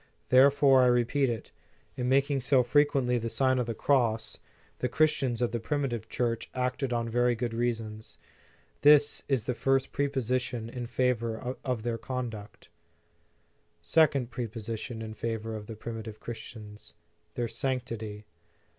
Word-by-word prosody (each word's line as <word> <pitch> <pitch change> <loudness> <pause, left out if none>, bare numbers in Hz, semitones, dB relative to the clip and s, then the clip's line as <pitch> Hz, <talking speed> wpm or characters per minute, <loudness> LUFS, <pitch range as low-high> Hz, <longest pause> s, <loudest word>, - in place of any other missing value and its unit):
Therefore, 135 +1 +6
I 125 - +5
repeat 125 +3 +2
it, 115 -2 -5 0.4
in 125 0 -1
making 140 +1 +2
so 130 0 +3
frequently 135 -2 +2
the 115 0 -3
Sign 130 +3 +2
of 120 - -1
the 115 - -3
Cross, 115 -5 +1 0.4
the 125 - -1
Chris 155 +4 +3
tians 125 -3 -1
of 120 - 0
the 120 - -2
primitive 120 -3 -2
Church 115 -2 -1
acted 125 +1 -1
on 120 -1 0
very 120 +1 +2
good 115 0 -3
reasons. 115 -2 -3 0.6
This 145 0 +5
is 130 -6 0
the 125 - 0
first 135 +2 +1
prepossession 125 -4 -1
in 120 -1 -5
favor 125 0 -1
of 125 -5 -2
their 115 -1 -2
conduct. 115 -4 -6 1.1
Second 140 - +3
prepossession 115 -1 -5
in 110 0 -6
favor 115 0 -3
of 105 -1 -7
the 115 - -7
primi 115 +1 -6
tive 110 -1 -9
Christians: 105 -2 -9 0.4
Their 120 -1 -1
sanctity. 115 -3 -3
120 Hz, 145 wpm, -29 LUFS, 115-130 Hz, 1.1 s, Therefore